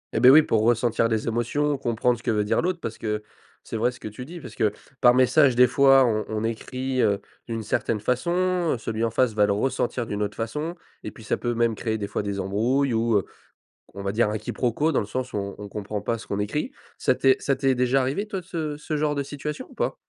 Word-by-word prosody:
Et -, -, +2 dB
beh 125 Hz, +2 st, +8 dB
oui, 155 Hz, +3 st, +8 dB
pour 110 Hz, -, +1 dB
ressentir 115 Hz, 0 st, +2 dB
les 110 Hz, 0 st, -1 dB
émotions, 120 Hz, +6 st, 0 dB
comprendre 120 Hz, -1 st, +1 dB
ce -, -, -17 dB
que -, -, -2 dB
veut 105 Hz, -1 st, +1 dB
dire 105 Hz, -, +1 dB
l'autre, 180 Hz, 0 st, -1 dB
parce 115 Hz, -6 st, -5 dB
que 105 Hz, -1 st, -2 dB, 0.4 s
c'est 115 Hz, -, -5 dB
vrai 120 Hz, +3 st, +2 dB
ce 125 Hz, -, -14 dB
que -, -, -7 dB
tu 110 Hz, +4 st, -8 dB
dis, 170 Hz, +4 st, -9 dB
parce -, -, -10 dB
que, 105 Hz, -2 st, +2 dB, 0.3 s
par 120 Hz, 0 st, +6 dB
message 130 Hz, 0 st, +4 dB
des 125 Hz, +1 st, +7 dB
fois 135 Hz, +1 st, +5 dB
on 110 Hz, -2 st, +1 dB
on 110 Hz, 0 st, -3 dB
écrit 130 Hz, +3 st, -2 dB
heu, 100 Hz, -3 st, +2 dB, 0.3 s
d'une 115 Hz, -2 st, -3 dB
certaine 105 Hz, +1 st, -1 dB
façon, 175 Hz, -, 0 dB
celui 110 Hz, 0 st, -3 dB
en 115 Hz, -, +2 dB
face 120 Hz, 0 st, +2 dB
va 105 Hz, -1 st, +4 dB
le 100 Hz, -, +2 dB
ressentir 120 Hz, +1 st, -1 dB
d'une 105 Hz, -1 st, -4 dB
autre 105 Hz, 0 st, -2 dB
façon 150 Hz, +10 st, -3 dB, 0.3 s
et -, -, -4 dB
puis 110 Hz, -, -14 dB
ça -, -, 0 dB
peut 120 Hz, -1 st, -2 dB
même 115 Hz, -1 st, +2 dB
créer 110 Hz, 0 st, -2 dB
des 100 Hz, -, -3 dB
fois -, -, -2 dB
des 100 Hz, -1 st, -3 dB
embrouilles, 115 Hz, +8 st, +1 dB
ou 115 Hz, -1 st, +1 dB
heu, 95 Hz, -, -1 dB, 0.7 s
on 100 Hz, -, -6 dB
va 100 Hz, 0 st, -2 dB
dire 110 Hz, 0 st, +2 dB
un 105 Hz, -, -2 dB
quiproquo, 135 Hz, +10 st, -1 dB
dans -, -, +2 dB
le 105 Hz, -, -4 dB
sens 125 Hz, +4 st, -4 dB
où 105 Hz, -, -2 dB
on 100 Hz, 0 st, -4 dB
on 105 Hz, 0 st, -7 dB
comprend 105 Hz, 0 st, -4 dB
pas 115 Hz, +2 st, -1 dB
ce -, -, -11 dB
qu'on 100 Hz, -, -3 dB
écrit. 150 Hz, -, -2 dB, 0.3 s
Ça 130 Hz, -, +2 dB
t'est 130 Hz, +1 st, +4 dB
ça 140 Hz, -1 st, 0 dB
t'est 135 Hz, -1 st, +2 dB
déjà 125 Hz, +2 st, +2 dB
arrivé, 145 Hz, +12 st, -1 dB
toi 195 Hz, -3 st, -4 dB
ce 160 Hz, -4 st, -4 dB
ce 150 Hz, +1 st, -4 dB
genre 150 Hz, 0 st, +1 dB
de 140 Hz, -, -1 dB
situation, 145 Hz, +2 st, -6 dB
ou -, -, -15 dB
pas? -, -, -1 dB
120 Hz, 255 wpm, -25 LUFS, 110-135 Hz, 0.7 s, beh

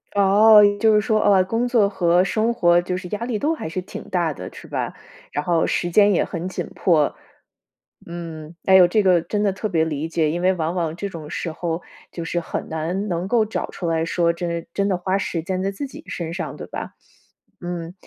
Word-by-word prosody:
哦， 210 Hz, +2 st, +7 dB, 0.2 s
就 220 Hz, -1 st, +4 dB
是 210 Hz, -, +4 dB
说， 215 Hz, 0 st, +1 dB
啊， 195 Hz, -2 st, +5 dB
工 230 Hz, +6 st, -1 dB
作 225 Hz, -5 st, +3 dB
和 180 Hz, -2 st, +3 dB
生 220 Hz, +4 st, 0 dB
活 175 Hz, -6 st, +4 dB
就 180 Hz, +1 st, -3 dB
是 185 Hz, 0 st, -7 dB
压 215 Hz, +2 st, -3 dB
力 235 Hz, -3 st, -2 dB
都 305 Hz, +8 st, 0 dB
还 300 Hz, -, -5 dB
是 180 Hz, +3 st, -3 dB
挺 -, -, -9 dB
大 175 Hz, -4 st, 0 dB
的， 90 Hz, -8 st, -8 dB
是 -, -, -11 dB
吧？ -, -, -3 dB, 0.4 s
然 145 Hz, -, -2 dB
后 170 Hz, -1 st, +1 dB
时 175 Hz, -, -1 dB
间 205 Hz, +3 st, +5 dB
也 -, -, +2 dB
很 175 Hz, -1 st, -5 dB
紧 185 Hz, -, -5 dB
迫。 155 Hz, -5 st, +2 dB, 0.9 s
嗯， 165 Hz, -2 st, -8 dB
哎 190 Hz, -, +6 dB
哟， 180 Hz, -2 st, +8 dB
这 210 Hz, +3 st, +2 dB
个 180 Hz, -3 st, +4 dB
真 205 Hz, +5 st, -2 dB
的 200 Hz, -, +2 dB
特 195 Hz, +3 st, -3 dB
别 165 Hz, -5 st, +1 dB
理 155 Hz, -1 st, -2 dB
解， 160 Hz, -2 st, 0 dB
因 175 Hz, -, -3 dB
为 185 Hz, +1 st, +3 dB
往 165 Hz, 0 st, -2 dB
往 165 Hz, -3 st, -1 dB
这 200 Hz, +2 st, -4 dB
种 160 Hz, -4 st, -9 dB
时 165 Hz, -, -4 dB
候， 170 Hz, +1 st, -3 dB, 0.3 s
就 170 Hz, -, -6 dB
是 175 Hz, +1 st, -2 dB
很 170 Hz, -, -5 dB
难 175 Hz, +6 st, -3 dB
能 175 Hz, +1 st, -2 dB
够 220 Hz, +1 st, +2 dB
找 215 Hz, -, -4 dB
出 175 Hz, -, -5 dB
来 165 Hz, 0 st, 0 dB
说 170 Hz, 0 st, +1 dB
真 170 Hz, -1 st, -4 dB
真 200 Hz, 0 st, 0 dB
的 190 Hz, -, +1 dB
花 185 Hz, +2 st, 0 dB
时 175 Hz, -3 st, -2 dB
间 185 Hz, +1 st, -2 dB
在 195 Hz, +1 st, -1 dB
自 275 Hz, +8 st, -5 dB
己 305 Hz, +3 st, -12 dB
身 165 Hz, -2 st, -5 dB
上， 175 Hz, -, -5 dB
对 -, -, -8 dB
吧？ -, -, -6 dB, 0.7 s
嗯， 175 Hz, -1 st, -5 dB
180 Hz, 240 characters per minute, -22 LUFS, 165-200 Hz, 0.9 s, 哟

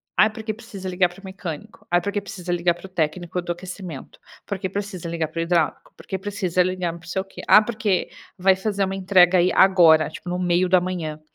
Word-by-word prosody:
"Ah 215 Hz, -, +5 dB
porque 220 Hz, 0 st, -5 dB
precisa 210 Hz, -4 st, -9 dB
ligar 180 Hz, -1 st, +2 dB
para 175 Hz, +2 st, -15 dB
o 195 Hz, -, -14 dB
mecânico, 185 Hz, -5 st, -8 dB
ah 175 Hz, -, +4 dB
porque 200 Hz, +3 st, -2 dB
precisa 180 Hz, -3 st, -6 dB
ligar 175 Hz, 0 st, +1 dB
para 175 Hz, -, -12 dB
o -, -, -10 dB
técnico 175 Hz, +1 st, -2 dB
do 175 Hz, -, -4 dB
aquecimento, 180 Hz, -4 st, -8 dB, 0.3 s
porque 190 Hz, -2 st, -3 dB
precisa 195 Hz, -3 st, -5 dB
ligar 165 Hz, -1 st, -2 dB
para 165 Hz, +1 st, -6 dB
o -, -, +1 dB
hidráulico, 170 Hz, 0 st, 0 dB
porque 190 Hz, -, -5 dB
precisa 190 Hz, -3 st, -1 dB
ligar 185 Hz, -1 st, -1 dB
para -, -, -9 dB
não 175 Hz, -, -16 dB
sei 190 Hz, +2 st, -1 dB
o -, -, -26 dB
quê, 195 Hz, -, -11 dB
ah 215 Hz, -, +8 dB
porque 215 Hz, -4 st, -1 dB, 0.3 s
vai 190 Hz, +1 st, +4 dB
fazer 200 Hz, +1 st, -1 dB
uma 190 Hz, 0 st, -3 dB
entrega 185 Hz, -1 st, +4 dB
aí 175 Hz, +1 st, +3 dB
agora, 170 Hz, -5 st, +6 dB
tipo 180 Hz, -, -9 dB
no 180 Hz, -, -1 dB
meio 180 Hz, 0 st, +1 dB
da 185 Hz, 0 st, +5 dB
manhã." 175 Hz, -4 st, -4 dB
185 Hz, 230 wpm, -23 LUFS, 175-195 Hz, 0.3 s, ah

